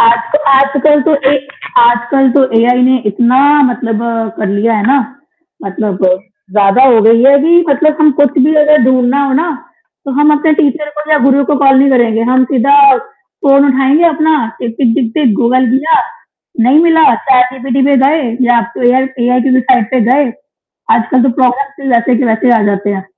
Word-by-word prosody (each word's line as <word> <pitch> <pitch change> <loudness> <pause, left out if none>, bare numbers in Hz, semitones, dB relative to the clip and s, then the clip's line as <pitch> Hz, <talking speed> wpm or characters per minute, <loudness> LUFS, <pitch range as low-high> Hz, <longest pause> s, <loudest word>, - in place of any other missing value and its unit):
आज 230 0 +3
तो 295 - +2
आजकल 280 +2 +2
तो 305 - 0 0.2
ए - - +1 0.5
आजकल 240 +3 +1
तो 275 - +2 0.2
एआई 245 +2 +1
ने 260 - +2
इतना 240 +5 0 0.3
मतलब 230 -3 -4 0.4
कर 210 - -4
लिया 210 +3 -1
है 205 +1 -2
ना, 275 +2 +2 0.7
मतलब 195 -1 -4 0.5
ज़्यादा 205 +4 +2
हो 240 -4 +4
गई 230 +1 +3
है 280 +1 +5
कि 345 +1 +3
मतलब 300 +2 0
हम 305 -1 +4
कुछ 285 +1 +1
भी 290 +4 +2
अगर 300 -2 +3
ढूँढ़ना 255 +2 0
हो 275 - -2
ना, 340 - -3 0.6
तो 275 - -6
हम 300 0 +3
अपने 310 +1 0
टीचर 295 +1 -2
को 300 +1 -7
या 305 - +3
गुरु 275 +1 +2
को 290 +1 -1
कॉल 270 -1 +3
नहीं 275 0 +2
करेंगे, 230 -3 0
हम 255 +2 +1
सीधा 270 +3 +1 0.2
फ़ोन 275 +1 -2
उठाएँगे 270 +5 +1
अपना 310 0 0 0.2
टिक, 230 -1 -6
टिक, 235 -4 +1
टिक, 240 -6 -2
टिक, 260 -9 0
गूगल 255 +2 +1
किया, 290 +5 0 0.7
नहीं 285 +5 +3
मिला 325 -7 +3 0.2
चैटजीपीटी 255 +1 0
पे 275 - +2
गए 310 +2 0 0.3
या 240 - +3 0.3
एआई 260 +2 +2 0.2
एआई 250 0 +1
के 265 - -1
वेबसाइट 255 -3 0
पे 255 - -1
गए, 275 -3 0 0.6
आजकल 240 +2 -1
तो 260 - +1
प्रॉब्लम्स 275 +3 -1
भी 275 - -6
वैसे 235 +1 0
के 270 - -1
वैसे 240 +2 0
आ - - -1
जाते 200 +1 -4
हैं। 195 -1 -6
260 Hz, 190 wpm, -10 LUFS, 240-285 Hz, 0.7 s, है